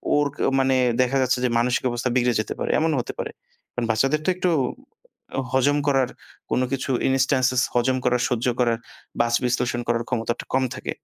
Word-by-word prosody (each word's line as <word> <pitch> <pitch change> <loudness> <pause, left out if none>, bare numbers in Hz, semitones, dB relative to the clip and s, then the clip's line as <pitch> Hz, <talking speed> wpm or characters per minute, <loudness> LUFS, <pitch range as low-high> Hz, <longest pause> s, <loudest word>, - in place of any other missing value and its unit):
ওর 145 0 +3 0.3
মানে 130 0 +3 0.3
দেখা 125 +2 +1
যাচ্ছে 130 0 +2
যে - - +2
মানসিক 120 +1 +1
অবস্থা 120 +1 -2
বিগড়ে 125 -1 +2
যেতে - - -5
পারে। - - -2
এমনও 160 -1 +1
হতে - - -7
পারে। - - -3 0.4
কারণ 120 - -2
বাচ্চাদের 135 +7 +1
তো - - +2
একটু 185 0 0 1.0
হজম 135 +2 +3
করার 135 -3 +3 0.4
কোন - - +2
কিছু 135 0 -2 0.2
ইনস্ট্যান্সেস 130 -1 +2
হজম 130 +2 +2
করার, 125 -1 +2
সহ্য 120 -1 -1
করার, 120 -2 +2 0.4
বাছ 120 0 0
বিশ্লেষণ 120 -1 0
করার 115 0 +1
ক্ষমতাটা 120 -1 -2
কম 130 - +3
থাকে। - - -8
125 Hz, 175 wpm, -23 LUFS, 120-135 Hz, 1.0 s, ওর